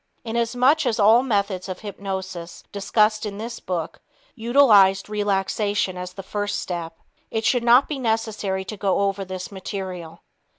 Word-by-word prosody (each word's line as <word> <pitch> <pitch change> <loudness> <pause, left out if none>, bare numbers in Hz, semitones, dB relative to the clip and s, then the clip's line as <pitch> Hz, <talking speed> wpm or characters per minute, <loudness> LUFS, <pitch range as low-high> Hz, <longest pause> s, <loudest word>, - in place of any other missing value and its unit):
Inasmuch 245 +6 +2
as 225 -2 0
all 220 +4 +6
methods 200 -6 -1
of 185 - -6
hypnosis 190 -4 -6
discussed 210 +1 +1
in 205 -2 -4
this 230 +2 -6
book 175 -4 -4 0.3
utilized 220 -6 +4
relaxation 205 -1 0
as 180 0 -6
the 195 - -8
first 205 +1 -2
step, 170 -2 -5 0.3
it 220 0 -2
should 245 -2 +2
not 245 +3 +6
be 295 -3 -4
necessary 220 -5 -1
to 215 - -6
go 195 -1 +1
over 195 0 0
this 185 0 -6
material. 185 -4 -6
205 Hz, 145 wpm, -23 LUFS, 190-225 Hz, 0.3 s, all